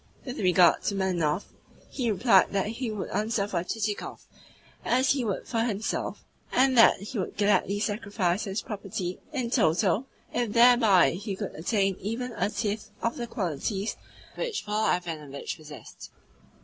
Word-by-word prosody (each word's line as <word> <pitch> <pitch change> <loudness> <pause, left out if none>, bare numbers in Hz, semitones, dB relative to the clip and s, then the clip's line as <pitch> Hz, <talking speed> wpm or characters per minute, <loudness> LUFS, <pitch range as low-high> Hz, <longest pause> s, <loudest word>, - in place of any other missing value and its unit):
With 255 +1 -6
regard 180 -2 +5
to 200 - 0
Manilov, 180 -3 0 0.5
he 245 -4 -1
replied 205 -2 +4
that 195 -1 +1
he 235 +2 -3
would 210 -3 -5
answer 210 0 0
for 175 -4 -1
Chichikov 210 +1 -4 0.6
as 255 +2 +2
he 275 -3 +1
would 205 -5 -3
for 230 - -1
himself, 220 -2 -2 0.3
and 260 +1 +3
that 230 -4 +7
he 210 +3 -5
would 185 - -4
gladly 205 0 +2
sacrifice 205 -2 -1
his 195 +2 -3
property 195 -3 -5
in 255 -5 -2
toto 200 - +2 0.3
if 235 -4 -1
thereby 230 - +6
he 195 +3 -4
could 200 0 -5
attain 195 +3 0
even 235 +5 -3
a 220 - -1
tithe 210 -1 -2 0.2
of 230 - 0
the 240 - -4
qualities 195 - -2 0.4
which 470 - -3
Paul 210 +1 +1
Ivanovitch 155 -6 -4
possessed. 155 -2 -11
205 Hz, 150 wpm, -27 LUFS, 185-230 Hz, 0.6 s, that